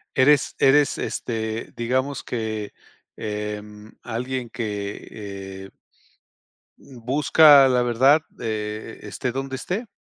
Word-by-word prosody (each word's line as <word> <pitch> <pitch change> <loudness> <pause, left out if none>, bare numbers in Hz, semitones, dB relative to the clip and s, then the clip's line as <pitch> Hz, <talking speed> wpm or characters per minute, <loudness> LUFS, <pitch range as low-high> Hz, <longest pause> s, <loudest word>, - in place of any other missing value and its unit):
Eres 140 +2 +4
eres, 140 +1 +4
este, 110 -1 -4
digamos 130 +3 -1
que, 110 -3 -4 0.4
em, 105 0 -6
alguien 125 +1 -4
que, 105 -4 -5 0.6
eh - - -12 1.1
mm, 130 -3 -14
busca 145 +1 +7
la 125 -1 +2
verdad, 130 +6 +4
de, 110 0 -5
eh, - - -14
esté, 125 +4 -3
donde 135 0 -4
esté. 205 - -4
120 Hz, 110 wpm, -23 LUFS, 110-135 Hz, 1.1 s, busca